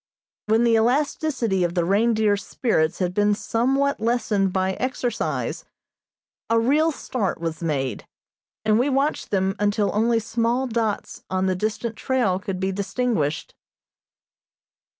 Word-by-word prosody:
When 220 Hz, +2 st, +3 dB
the 235 Hz, -1 st, +3 dB
elasticity 250 Hz, -, +1 dB
of 175 Hz, 0 st, -1 dB
the 175 Hz, -2 st, +1 dB
reindeer's 210 Hz, +1 st, +2 dB
spirits 165 Hz, -, 0 dB
had 180 Hz, -1 st, -1 dB
been 205 Hz, +1 st, +2 dB
somewhat 270 Hz, +6 st, 0 dB
lessened 215 Hz, -4 st, +1 dB
by 190 Hz, 0 st, 0 dB
exercise, 250 Hz, 0 st, -2 dB, 0.9 s
a 230 Hz, 0 st, +4 dB
real 295 Hz, +8 st, +3 dB
start 235 Hz, -, -3 dB
was 165 Hz, -1 st, -4 dB
made, 140 Hz, -6 st, -2 dB, 0.6 s
and 215 Hz, +1 st, +4 dB
we 260 Hz, +4 st, +2 dB
watched 275 Hz, +3 st, 0 dB
them 195 Hz, -1 st, 0 dB
until 205 Hz, 0 st, +1 dB
only 230 Hz, +2 st, +2 dB
small 230 Hz, +3 st, 0 dB
dots 225 Hz, -4 st, -2 dB
on 185 Hz, 0 st, 0 dB
the 190 Hz, -, +2 dB
distant 215 Hz, +3 st, -2 dB
trail 240 Hz, -9 st, +1 dB
could 195 Hz, -2 st, -4 dB
be 190 Hz, +1 st, 0 dB
distinguished. 195 Hz, -, -1 dB
215 Hz, 130 wpm, -23 LUFS, 190-240 Hz, 0.9 s, a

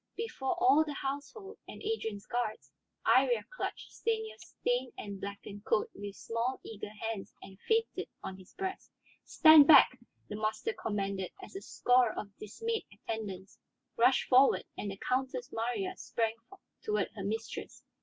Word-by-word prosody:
Before 370 Hz, -10 st, -2 dB
all 360 Hz, -5 st, +6 dB
the 300 Hz, -2 st, -6 dB
household, 290 Hz, -, -5 dB
and -, -, -9 dB
Adrian's 225 Hz, -, -3 dB
guards, 240 Hz, -3 st, -3 dB, 0.3 s
Iría 485 Hz, -1 st, +4 dB
clutched -, -, -4 dB
Stanief's 445 Hz, -1 st, -3 dB
stained 245 Hz, +1 st, 0 dB
and 200 Hz, -2 st, -6 dB
blackened 200 Hz, 0 st, -7 dB
coat 210 Hz, -, +1 dB
with 200 Hz, 0 st, -7 dB
small, 235 Hz, +3 st, -2 dB
eager 210 Hz, -2 st, -7 dB
hands 215 Hz, -1 st, -5 dB
and 190 Hz, 0 st, -12 dB
fainted 450 Hz, 0 st, +1 dB
on 190 Hz, -, -5 dB
his 185 Hz, -, -15 dB
breast. 380 Hz, 0 st, -4 dB, 0.4 s
"Stand 315 Hz, -3 st, +8 dB
back!" 260 Hz, -4 st, +8 dB, 0.3 s
the 210 Hz, -, -5 dB
master 220 Hz, -, -1 dB
commanded 200 Hz, -, -3 dB
as 380 Hz, -, -11 dB
a 390 Hz, -, -5 dB
score 245 Hz, -, +2 dB
of 200 Hz, -1 st, -6 dB
dismayed 455 Hz, -, -3 dB
attendants 195 Hz, -4 st, -6 dB, 0.4 s
rushed 250 Hz, +3 st, +4 dB
forward 260 Hz, +2 st, +5 dB
and 205 Hz, -, -4 dB
the 195 Hz, -, -6 dB
Countess 255 Hz, +1 st, -2 dB
Marya 245 Hz, -, -2 dB
sprang 225 Hz, -1 st, -1 dB, 0.5 s
toward 425 Hz, -1 st, 0 dB
her 200 Hz, -, -6 dB
mistress. 220 Hz, +3 st, -5 dB
245 Hz, 145 wpm, -32 LUFS, -, 0.5 s, Stand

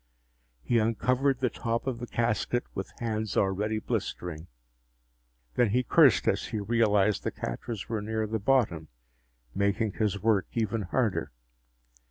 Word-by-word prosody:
He 120 Hz, -, +2 dB
uncovered 125 Hz, +4 st, +1 dB
the 125 Hz, -, +1 dB
top 115 Hz, -1 st, -2 dB
of 130 Hz, -3 st, -2 dB
the 120 Hz, -, -5 dB
casket 120 Hz, +1 st, 0 dB
with 95 Hz, -, -5 dB
hands 110 Hz, -3 st, -2 dB
already 105 Hz, +3 st, +1 dB
blistering. 85 Hz, -5 st, -4 dB, 1.1 s
Then 120 Hz, -3 st, +3 dB
he 125 Hz, +5 st, +2 dB
cursed -, -, +5 dB
as -, -, +1 dB
he 110 Hz, -, -3 dB
realized 105 Hz, -1 st, +2 dB
the -, -, 0 dB
catches 110 Hz, -5 st, -5 dB
were 110 Hz, -2 st, -2 dB
near 110 Hz, +1 st, -1 dB
the 110 Hz, +1 st, -2 dB
bottom, 100 Hz, -9 st, +1 dB, 0.7 s
making 100 Hz, +2 st, +1 dB
his 105 Hz, -2 st, 0 dB
work 105 Hz, -2 st, +2 dB
even 115 Hz, -1 st, 0 dB
harder. 100 Hz, -2 st, -1 dB
110 Hz, 140 wpm, -28 LUFS, 100-120 Hz, 1.1 s, cursed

